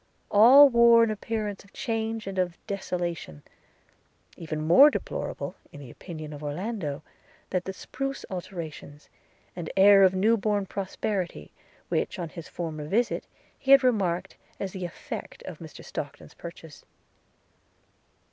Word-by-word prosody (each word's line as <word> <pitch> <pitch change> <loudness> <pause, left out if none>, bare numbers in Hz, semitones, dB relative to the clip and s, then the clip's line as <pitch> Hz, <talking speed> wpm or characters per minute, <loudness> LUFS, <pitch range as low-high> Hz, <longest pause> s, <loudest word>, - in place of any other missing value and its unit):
All 255 +8 +9
wore 235 -2 +6
an 225 - +1
appearance 215 -1 -4
of 200 - -22
change 225 -2 -3
and 195 -1 -4
of 180 -2 -1
desolation, 175 - -4 0.9
even 155 -2 -5
more 185 - +8
deplorable, - - -4 0.2
in 145 - -11
the 135 -4 -10
opinion 155 -4 -8
of 145 0 -9
Orlando, 155 -1 -4 0.5
that 185 -1 -1
the 190 - -3
spruce 270 +7 -5
alterations, 165 -5 -8 0.5
and 170 -3 -5
air 200 +1 +8
of 190 -1 +5
new 220 +5 +3
born 205 -1 0
prosperity, 195 -1 -4 0.4
which, - - -1
on 170 -3 -4
his 170 -1 -9
former 155 -3 -5
visit, 230 +8 0 0.3
he 270 - -7
had 275 0 +8
remarked 195 -7 0 0.2
as 195 - -3
the 185 -2 -5
effect 175 - -8
of 170 -4 -8
Mr 160 -2 -11
Stockton's 145 0 -7
purchase. 165 -3 -11
190 Hz, 140 wpm, -27 LUFS, 165-220 Hz, 0.9 s, All